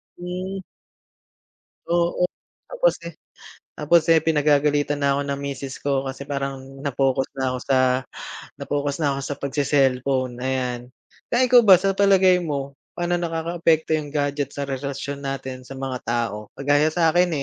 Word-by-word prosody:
Hmm. 185 +2 -5 1.3
Oo, 170 +1 +1 0.4
tapos, - - +1
eh, - - -6 0.6
tapos, 165 +3 +4
eh, 165 - +7
pinagagalitan 145 -1 +2
na 140 -1 +1
ako 140 - 0
ng 140 0 -2
misis 135 -1 -5
ko 135 -1 -1
kasi 135 +1 -6
parang 140 -1 -3 0.2
na-focus 135 -1 0
na 130 -1 -1
ako 125 - -3
sa 135 -1 +4 0.8
na-focus 145 -1 -2
na 145 - +2
ako 135 - -4
sa 145 - -4
pagse-cellphone, 135 -2 +1
ayan. 130 -2 -1 0.5
Kaya 250 +2 +3
ikaw 245 -1 +8
ba, 190 -3 +9
sa 195 +2 0
palagay 190 -2 +4
mo, 140 -4 -3 0.2
paano 175 0 0
nakakaapekto 165 -1 0
yung 150 -1 -4
gadget 145 -1 -1
sa 140 - -2
relasyon 140 +1 -4
natin 130 -1 -5
sa 135 - -8
mga 130 -1 -4
tao? 115 -3 -2
Kagaya 145 +2 +3
sa 165 -2 +3
akin, 175 0 +3
145 Hz, 150 wpm, -23 LUFS, 135-170 Hz, 1.3 s, ba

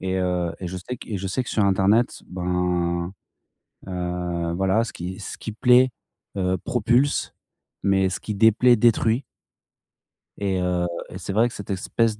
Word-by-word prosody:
Et 95 0 -2
heu 90 -2 0
et 90 - -4
je 95 - -5
sais 110 +8 -6
que - - -12
et 105 - -2
je 95 - -4
sais 95 +7 -1
que, 125 - -7
sur 105 - +2
internet, 100 +4 +2
ben, 90 -1 -1 0.7
heu, 90 -2 -2
voilà, 95 +4 +2
ce 115 - -8
qui 90 +3 -6
ce - - -6
qui 110 - -6
plaît, 125 +4 +5 0.5
heu, 95 0 +1
propulse, 125 +4 +1 0.5
mais 95 -1 +3
ce 95 +1 -3
qui 105 - -4
déplaît, 110 +4 +5
détruit. 115 +2 +3 1.1
Et 95 -2 -1
heu, 90 -1 0 0.2
et - - -8
c'est 95 +1 -5
vrai 110 +4 +4
que 120 - -8
cette 100 - -9
espèce 105 +3 0
95 Hz, 170 wpm, -24 LUFS, 90-110 Hz, 1.1 s, plaît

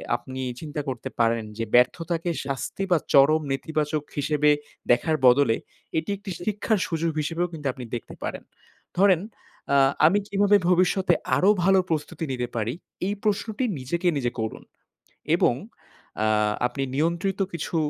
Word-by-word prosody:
আপনি 130 0 -6 0.2
চিন্তা 150 -2 -4
করতে 125 -4 -4
পারেন 115 -1 +2
যে 115 - -1
ব্যর্থতাকে 165 +7 +2 0.2
শাস্তি 140 +7 -3
বা 175 - +6 0.2
চরম 150 +3 +6
নেতিবাচক 150 +2 -1
হিসেবে 150 +1 +2 0.4
দেখার 125 +6 +3
বদলে, 125 -2 +5 0.4
এটি 160 +3 -2
একটি 200 -1 -8
শিক্ষার 210 0 0
সুযোগ 165 -1 -1
হিসেবেও 165 +3 -1
কিন্তু 150 -3 -4
আপনি 130 - -8
দেখতে 120 - -7
পারেন। - - -4 0.5
ধরেন 185 -3 +5 0.5
আ - - +5 0.3
আমি 195 +6 +5
কিভাবে 205 0 +4
ভবিষ্যতে 185 +1 +3 0.2
আরো 195 - +4
ভালো 190 +1 +5
প্রস্তুতি 160 0 -2
নিতে 125 -1 -2
পারি 115 +1 -1 0.3
এই 200 - 0
প্রশ্নটি 215 +3 -1 0.2
নিজেকে 170 +8 -2
নিজে 120 -3 -1
করুন। 110 0 -4 0.7
এবং - - +3 0.7
আ - - +2 0.4
আপনি 135 +2 -4
নিয়ন্ত্রিত 170 +6 0
কিছু 170 0 -3
160 Hz, 140 wpm, -25 LUFS, 135-185 Hz, 0.7 s, বা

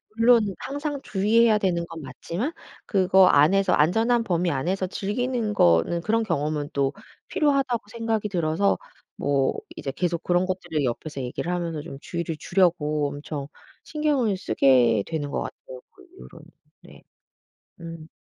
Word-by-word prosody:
물론 235 +1 +5 0.2
항상 285 +1 -4
주의해야 215 +2 +3
되는 175 -4 0
건 165 -1 -8
맞지만 170 - -4 0.3
그거 190 -2 +4
안에서 180 +7 +4
안전한 225 +10 +3
범위 175 -3 0
안에서 180 +7 -1
즐기는 220 +3 -2
거는 85 - +3
그런 225 +4 +1
경험은 150 -5 -2
또 140 -1 0 0.3
필요하다고 275 -5 +1
생각이 225 -2 -2
들어서 175 +2 +1 0.4
뭐 140 -2 +1 0.2
이제 135 - -4
계속 170 +3 -2
그런 175 +1 +2
것들을 175 -5 -2
옆에서 135 +3 -4
얘기를 125 +8 -4
하면서 170 -4 -3
좀 150 -3 -9
주의를 170 -1 -4
주려고 155 -6 +1
엄청 145 0 -6 0.4
신경을 285 -10 0
쓰게 125 - +3
되는 150 -3 -3
것 - - -2
같아요 130 -1 -9
그 390 - -19
이후로는. 370 - -14 0.4
네. - - -16 0.8
음. 165 -1 -9
175 Hz, 315 characters per minute, -24 LUFS, 150-220 Hz, 0.8 s, 물론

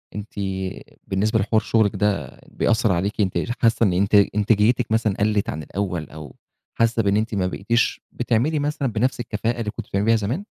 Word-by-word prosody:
أنتِ 105 +1 -7 0.7
بالنسبة 105 +3 +1
لحوار 110 +2 +2
شُغلِك 110 -2 +1
ده 100 -10 -1
بيأثّر 110 -2 +1
عليكِ 100 +4 -1
أنتِ 95 -2 0
ر 120 - -2
حاسّة 115 0 +3
إن 95 -4 +3
أنتِ 100 +3 +2 0.2
إنتاجيتِك 110 +3 +2
مثلًا 110 -2 +2
قلّت 105 0 +1
عن 75 +2 -4
الأول، 90 -3 -4
أو 75 -3 -10 0.4
حاسّة 115 -1 +2
بإن 100 +1 +2
أنتِ 110 0 -1
ما 95 -2 +1
بقيتيش 115 +5 0
بتعملي 125 +6 0
مثلًا 145 -1 -1
بنَفْس 125 +4 0
الكفاءة 115 0 -2
اللي 105 -2 -2
كنتِ 115 -2 -8
بتعملي 100 +2 -1
بيها 115 0 +4
زمان؟ 115 - -2
110 Hz, 180 wpm, -22 LUFS, 100-115 Hz, 0.7 s, بيها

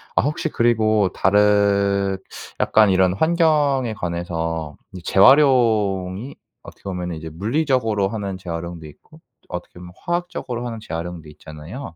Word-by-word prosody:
어 - - +4
혹시 150 +4 -2
그리고 110 -5 +2
다른 100 -1 +2 0.4
약간 110 -1 +4
이런 95 -1 +3
환경에 150 - +2
관해서 85 -4 -4 0.2
이 90 - -8
재활용이 110 - +3 0.3
어떻게 - - -14
보면은 90 -3 -4
이제 80 0 -7
물리적으로 110 - 0
하는 100 -4 -4
재활용도 85 -2 -6
있고 155 - -18 0.3
어떻게 90 0 -8
보면 90 0 -11
화학적으로 175 -9 -4
하는 115 -2 -5
재활용도 85 -3 -6
있잖아요? 80 - -10
100 Hz, 320 characters per minute, -21 LUFS, 90-120 Hz, 0.4 s, 어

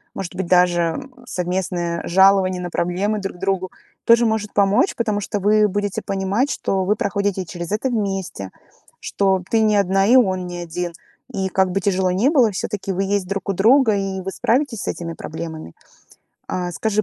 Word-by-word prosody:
может 185 -2 -6
быть 185 -1 -3
даже 175 -2 +3 0.3
совместное 175 -3 -2
жалование 190 0 +4
на 175 - -4
проблемы 190 +6 -1
друг 195 -2 -5
другу 190 -1 -1 0.3
тоже 235 +1 +5
может 220 -2 -1
помочь. 205 - +2
Потому 215 -3 -1
что 205 +1 -3
вы 210 +2 +4
будете 205 0 -2
понимать, 200 +7 -1
что 190 -8 -1
вы 210 +3 +2
проходите 200 -2 -1
через 175 +1 -7
это 215 +5 0
вместе, 195 - -3 0.5
что 190 -2 +1
ты 225 - +3
не 215 -1 +3
одна 195 0 +2
и 245 - +5
он 185 -7 +3
не 175 0 -6
один. 175 0 -4 0.4
И 190 -3 -2
как 190 0 +1
бы 195 - 0
тяжело 185 -1 +1
не 200 +9 +2
было, 255 -8 +4
всё-таки 195 +1 -4
вы 195 - -1
есть 195 -1 -1
друг 195 +1 -4
у - - +2
друга 225 +4 +4
и 195 -1 -2
вы 195 +1 -5
справитесь 240 -1 0
с - - -6
этими 170 -1 -4
проблемами. 160 - -7 0.8
А, 180 -1 -3
скажи, 215 +4 0
195 Hz, 180 wpm, -21 LUFS, 180-210 Hz, 0.8 s, тоже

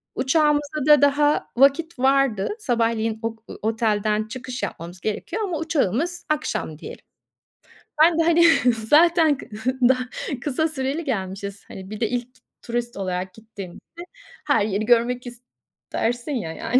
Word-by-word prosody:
Uçağımıza 295 0 +1
da 295 -2 +7
daha 290 +1 +2
vakit 280 +3 +3
vardı. 265 -6 +2
Sabahleyin 230 - 0
ok 225 0 -5
ııı, - - -9
otelden 215 -1 0
çıkış 255 0 -6
yapmamız 175 -1 -6
gerekiyor 390 - -3
ama 360 -5 -2
uçağımız 320 - -1
akşam 295 - -2
diyelim. - - -10 1.0
Ben 335 0 +4
de, 330 - +4
hani, 340 +1 +4 0.3
zaten 305 +6 +4
kı - - -11 0.4
da 260 - +4 0.4
kısa 300 +4 0
süreli 290 +2 -3
gelmişiz. 200 -4 -4
Hani, 190 0 -10
bir 215 -1 -7
de 225 - 0
ilk 245 0 -3 0.3
turist 240 0 -4
olarak 185 -1 -3
gittiğimizde 220 - -11 0.5
her 280 -8 +3
yeri 210 +1 -1
görmek 240 +1 +2 0.7
istersin 245 +5 -1
ya 175 -10 -3
yani. 245 +9 +1
245 Hz, 135 wpm, -23 LUFS, 215-295 Hz, 1.0 s, da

